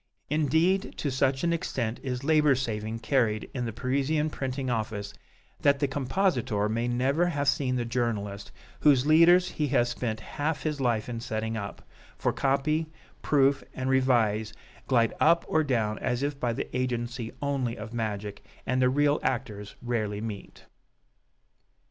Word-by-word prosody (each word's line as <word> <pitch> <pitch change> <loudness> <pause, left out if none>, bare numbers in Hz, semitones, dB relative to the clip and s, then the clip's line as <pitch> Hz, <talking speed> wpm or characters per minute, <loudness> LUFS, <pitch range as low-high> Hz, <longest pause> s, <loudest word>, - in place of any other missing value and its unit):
Indeed, 160 +6 +2
to 145 - -2
such 130 +1 +1
an 170 0 +2
extent 120 -8 -2
is 130 -1 -4
labor 150 -2 +4
saving 110 -3 -3
carried 110 -2 0
in 125 -2 -2
the 115 - -3
Parisian 140 +6 0
printing 130 -1 -3
office 110 -4 -3 0.5
that 140 0 +4
the 140 - +1
compositor 135 - 0
may 115 +2 -1
never 135 +8 +1
have 145 -5 -1
seen 140 -2 +2
the 120 -1 -1
journalist 110 -4 -2 0.3
whose 140 -3 +4
leaders 170 +4 +6
he 150 - -1
has 120 -2 +2
spent 115 -3 -3
half 145 +6 -3
his 150 -3 -2
life 115 -4 +1
in 120 -2 -4
setting 110 -1 -3
up, 100 -2 -6 0.3
for - - 0
copy, 140 +4 +1 0.3
proof 140 -1 +3
and 130 0 -1
revise 115 -5 +2 0.3
glide 115 -3 +3
up 170 +2 +4
or 160 - +2
down 115 -6 0
as 125 +2 -1
if 145 -1 -2
by 120 -3 0
the 115 - -5
agency 120 -2 -2
only 135 -5 -1
of 110 +2 -8
magic, 105 -3 -4 0.2
and 130 +1 +1
the 125 - +4
real 145 +2 +2
actors 110 -6 -3
rarely 110 -4 -1
meet. 105 -2 -7
130 Hz, 155 wpm, -28 LUFS, 115-145 Hz, 0.5 s, leaders